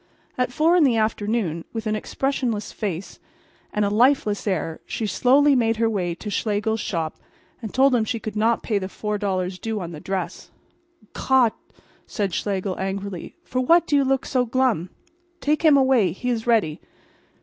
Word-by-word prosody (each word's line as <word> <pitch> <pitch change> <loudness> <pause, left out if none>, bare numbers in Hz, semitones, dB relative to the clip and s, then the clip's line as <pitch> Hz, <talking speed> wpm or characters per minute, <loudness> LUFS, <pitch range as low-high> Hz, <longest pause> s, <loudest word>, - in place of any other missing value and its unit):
At 250 0 0
four 320 +7 +3
in 350 - +5
the 250 -5 +3
afternoon, 215 -6 -1
with 225 -1 -4
an 215 0 0
expressionless 240 -1 -2
face 195 -3 -5 0.5
and 210 0 0
a 200 - 0
lifeless 220 -2 +2
air 165 -4 -1
she 225 - -3
slowly 275 +6 +4
made 225 -2 +2
her 225 0 +2
way 180 -6 -1
to 210 +4 -7
Schlegel's 215 +2 -1
shop 165 -6 -3 0.4
and 220 -4 -6
told 270 +1 +4
him 235 -3 +3
she 225 +1 -2
could 215 -1 -6
not 225 +2 +1
pay 210 -3 0
the 190 - -4
$4 195 -3 -3
due 225 -1 -2
on 175 -3 -6
the 155 - -8
dress. 190 +3 -4 0.6
"Gott!" 260 -4 +3 0.6
cried 200 -4 -1
Schlegel, 195 -1 -2
angrily. 195 -1 -4
"For 255 - -2
what 335 +6 +4
do 295 - +1
you 280 - +4
look 270 0 0
so 255 -2 +1
glum? 240 -8 0 0.5
Take 300 -1 +1
him 305 -3 +6
away. 260 - +3
He 250 +6 -3
is 230 -1 -3
ready. 215 -10 +2
220 Hz, 175 wpm, -23 LUFS, 195-250 Hz, 0.6 s, him